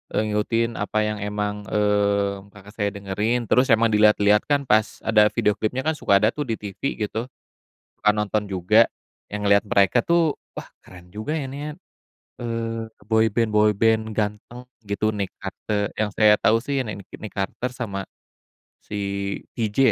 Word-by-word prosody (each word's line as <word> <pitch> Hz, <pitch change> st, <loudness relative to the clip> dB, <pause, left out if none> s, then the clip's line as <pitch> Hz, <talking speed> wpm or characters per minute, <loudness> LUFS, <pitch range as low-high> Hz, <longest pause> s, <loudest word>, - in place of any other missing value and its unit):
Eee, -, -, +2 dB
ngikutin 115 Hz, +2 st, 0 dB
apa -, -, -2 dB
yang 105 Hz, 0 st, -2 dB
emang, 105 Hz, 0 st, -3 dB
mmm, 100 Hz, -1 st, +1 dB
kakak 105 Hz, 0 st, -13 dB
saya 105 Hz, -1 st, -2 dB
dengerin, 105 Hz, +4 st, -2 dB
terus 125 Hz, +1 st, +4 dB
emang 115 Hz, 0 st, +4 dB
dilihat-lihat 105 Hz, -1 st, +4 dB
kan 145 Hz, -1 st, +2 dB
pas 110 Hz, -4 st, +1 dB
ada 105 Hz, -1 st, +5 dB
video 105 Hz, -, +1 dB
klipnya 125 Hz, +4 st, -1 dB
kan, 160 Hz, -, +1 dB
suka 100 Hz, -10 st, +2 dB
ada 110 Hz, -, +4 dB
tuh 150 Hz, 0 st, -4 dB
di 115 Hz, -, -1 dB
TV 100 Hz, +5 st, -4 dB
gitu, 110 Hz, +2 st, -3 dB, 0.7 s
suka 105 Hz, -, +3 dB
nonton 105 Hz, 0 st, -1 dB
juga, 100 Hz, +4 st, +4 dB, 0.4 s
yang 105 Hz, 0 st, -5 dB
ngelihat 100 Hz, +1 st, +3 dB
mereka 100 Hz, +4 st, +3 dB
tuh, 165 Hz, +2 st, +1 dB, 0.2 s
wah -, -, -8 dB
keren 90 Hz, -1 st, -15 dB
juga 110 Hz, -, -4 dB
ya 135 Hz, -4 st, -4 dB
ini 140 Hz, -, -7 dB
ya, -, -, -4 dB, 0.7 s
eee, 115 Hz, -1 st, -3 dB, 0.3 s
boyband-boyband 110 Hz, 0 st, +2 dB
ganteng 105 Hz, +4 st, -4 dB, 0.2 s
gitu 100 Hz, +1 st, 0 dB
Nick 100 Hz, -2 st, -3 dB
Carter, 100 Hz, +1 st, -3 dB
yang 105 Hz, -1 st, 0 dB
saya 105 Hz, -1 st, +5 dB
tahu 110 Hz, +2 st, +3 dB
sih 135 Hz, +1 st, -1 dB
Nick 100 Hz, -3 st, -8 dB
Nick 110 Hz, -, -9 dB
Carter 105 Hz, +6 st, -3 dB
sama 100 Hz, -6 st, -4 dB, 0.7 s
si -, -, -9 dB, 0.6 s
TJ 110 Hz, -3 st, -2 dB
105 Hz, 160 wpm, -23 LUFS, 105-115 Hz, 0.7 s, ada